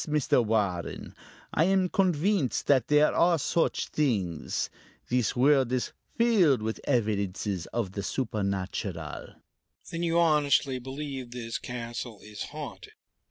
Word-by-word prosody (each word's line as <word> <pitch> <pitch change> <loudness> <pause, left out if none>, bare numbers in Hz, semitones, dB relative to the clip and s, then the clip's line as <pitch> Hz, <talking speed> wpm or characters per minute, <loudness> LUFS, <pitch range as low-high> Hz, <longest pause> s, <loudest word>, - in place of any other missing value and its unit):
"Yes, - - -6
Mr. 150 -5 +2
Warren, 100 -6 -1 0.4
I 160 - +3
am 190 0 +3
convinced 180 - +1
that 130 -5 +3
there 150 0 +4
are 170 0 +4
such 165 +3 0
things. 100 - -1 0.4
This 125 -2 +1
world 135 -1 +4
is 130 -1 -1 0.2
filled 190 - +4
with 110 0 -3
evidences 100 - -1
of 115 -6 -2
the 100 - -4
supernatural." 100 - -3 0.6
"Then 165 - -3
you 170 -1 +1
honestly 150 -5 +3
believe 135 0 -6
this 120 -2 -5
castle 120 -2 -6
is 105 -1 -6
haunted?" - - -8
125 Hz, 125 wpm, -28 LUFS, 105-150 Hz, 0.6 s, there